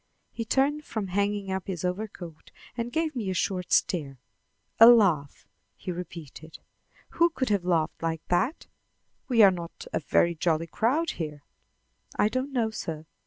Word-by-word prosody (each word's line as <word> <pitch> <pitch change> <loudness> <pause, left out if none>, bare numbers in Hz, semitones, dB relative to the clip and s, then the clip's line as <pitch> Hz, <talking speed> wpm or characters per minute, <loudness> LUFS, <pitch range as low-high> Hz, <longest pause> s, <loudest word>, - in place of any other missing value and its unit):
He 230 - -5
turned 280 +5 +1
from 215 -8 -4
hanging 200 +1 -1
up 190 -1 -3
his 180 -3 -4
overcoat, 180 -4 -5 0.3
and 235 0 -3
gave 320 +1 -1
me 220 -6 -2
a 185 - -2
short 180 0 -2
stare. 145 -7 +1 0.6
"A 225 - +11
laugh!" 185 - +4 0.3
he 185 - -5
repeated. 165 -3 -9 0.5
"Who 340 +1 +3
could 260 -6 -2
have 200 -4 +1
laughed 165 -3 0
like 165 -1 -3
that? 235 - 0 0.6
We 235 -4 +5
are 195 - +8
not 170 -2 -7
a - - +1
very 170 +2 +2
jolly 165 0 0
crowd 270 - 0
here." 150 -2 -5 0.7
"I 210 - +3
don't 255 +4 -2
know, 235 -4 0
sir. 160 -7 -5
190 Hz, 160 wpm, -27 LUFS, 165-235 Hz, 0.7 s, A